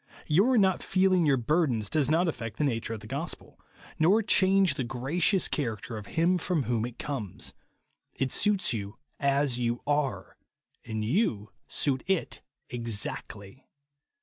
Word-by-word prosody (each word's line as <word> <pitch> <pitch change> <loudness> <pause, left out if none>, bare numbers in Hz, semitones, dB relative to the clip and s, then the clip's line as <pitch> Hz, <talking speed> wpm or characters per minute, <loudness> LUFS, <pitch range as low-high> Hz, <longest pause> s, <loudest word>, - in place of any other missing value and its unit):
Your 205 +12 +4
not 190 -3 +3
feeling 185 -3 +3
your 140 -2 +4
burdens 125 -4 +1
does 145 +5 +1
not 165 +3 +3
affuct 115 -8 -4
the - - 0
nature 115 -4 -1
of 110 - -9
the - - -11
gospel, - - -5 0.4
nor 195 +8 +4
change 195 -1 +4
the 135 - -3
gra 120 +1 -6
154f - - -1
INSENSIBILITY. - - +1
cious 190 +2 +4
character 115 -5 -3
of 105 - -10
Him 175 +2 +2
from 170 -3 0
whon\ 120 -1 0
it 120 -1 -11
comes. 125 -10 -5 0.6
It 135 -1 -1
suits 200 -9 +1
yon 100 -2 -4 0.3
as 140 -2 +1
you 120 0 -1
are, 145 -2 -1 0.5
and 110 -1 -3
yon 110 - 0 0.2
suit 135 -3 0
it 190 -3 -1 0.3
exactly. 115 -1 -5
140 Hz, 160 wpm, -28 LUFS, 115-175 Hz, 0.6 s, Your